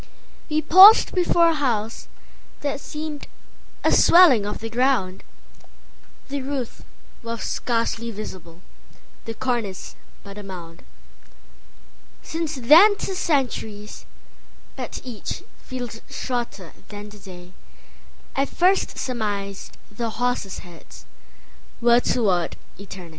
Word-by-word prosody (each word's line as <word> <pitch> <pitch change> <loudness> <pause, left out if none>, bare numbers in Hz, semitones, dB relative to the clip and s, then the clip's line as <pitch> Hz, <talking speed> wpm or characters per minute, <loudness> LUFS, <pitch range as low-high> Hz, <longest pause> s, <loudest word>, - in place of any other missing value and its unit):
We 310 0 0
paused 375 +8 +8
before 345 -2 +3
a - - +2
house 235 -7 -2 0.5
that 285 -1 -2
seemedA 300 0 -7 0.6
swelling 285 - +6
of 210 - -4
the 225 - -6
ground; 235 -6 0 1.1
The 280 0 -3
roof 265 -3 -5 0.4
was 230 -1 -5
scarcely 230 -1 -2
visible, 185 -6 -9 0.6
The 225 - -6
cornice 235 -7 -3 0.3
but 200 +1 -10
a - - -9
mound. 175 -4 -10 1.4
Since 325 -1 -4
then 340 - +8
'tis 380 -2 -4
centuries; 225 - -2 0.7
but - - -6
eachFeels 245 0 -7
shorter 235 -8 -5
than 205 0 -9
the 210 - -14 1.2
dayI 275 +1 +1
first 370 +3 +1
surmised 205 -5 -4
the 230 +2 -3
horses' 245 -4 -2
headsWere 235 +6 -3
toward 190 -8 +1 0.2
eternity. 190 -3 -10
235 Hz, 100 wpm, -23 LUFS, 205-285 Hz, 1.4 s, paused